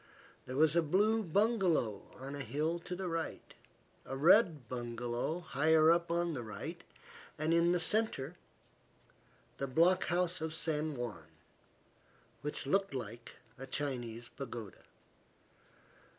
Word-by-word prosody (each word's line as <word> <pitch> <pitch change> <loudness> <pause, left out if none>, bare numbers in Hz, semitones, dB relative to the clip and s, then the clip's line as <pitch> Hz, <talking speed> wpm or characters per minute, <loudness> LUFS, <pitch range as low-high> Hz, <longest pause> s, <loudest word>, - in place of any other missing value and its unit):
There 130 - -5
was 155 +2 +4
a 170 - +5
blue 205 +8 +3
bungalow 190 - +2
on 135 +2 -7
a 145 - -4
hill 150 +7 -1
to 180 +1 -6
the 185 0 -4
right, 165 -1 -4 0.5
a 135 - -5
red 160 - +5
bungalow 120 +6 -3
higher 160 +1 +4
up 170 0 +2
on 170 0 0
the 130 - -3
right, 105 -3 -7 0.5
and 155 +2 +1
in 170 +1 +4
the 180 - +2
centre 180 -7 0 1.2
the 140 - -1
block 170 +7 +4
house 180 -1 0
of 160 0 -3
San 155 -2 -1
Juan, 110 - -5 1.1
which 150 0 -4
looked 195 +1 +1
like 115 -1 -6 0.3
a 135 - -7
Chinese 120 -5 -4
pagoda. 120 -6 -8
155 Hz, 130 wpm, -34 LUFS, 125-170 Hz, 1.2 s, a